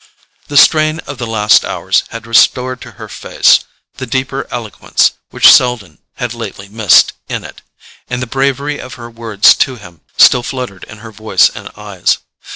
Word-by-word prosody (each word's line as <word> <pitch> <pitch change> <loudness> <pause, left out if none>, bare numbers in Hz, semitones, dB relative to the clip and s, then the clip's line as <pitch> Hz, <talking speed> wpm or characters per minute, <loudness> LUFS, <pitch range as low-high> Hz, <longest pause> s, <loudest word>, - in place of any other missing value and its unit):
The 145 - -2
strain 155 +1 +4
of 140 -2 -10
the 120 - -4
last 105 -2 +3
hours - - -1
had 115 0 -9
restored 125 +2 +1
to - - -12
her - - -11
face - - +2 0.4
the 130 - -6
deeper 130 +2 -3
eloquence 115 -4 -1 0.2
which - - +6
Selden 115 -10 0 0.2
had - - -5
lately 95 - -8
missed 105 -3 +3 0.2
in - - -4
it, - - -12 0.5
and 125 -1 -3
the 125 - -3
bravery 140 +3 -2
of 130 - -9
her 120 -1 -11
words 115 -3 +3
to 130 - 0
him 85 -8 -15 0.2
still 125 - +6
fluttered 125 -7 -7
in 110 - -13
her 115 - -10
voice 110 -3 +2
and - - -10
eyes. 100 -4 -1
120 Hz, 170 wpm, -13 LUFS, 105-130 Hz, 0.5 s, which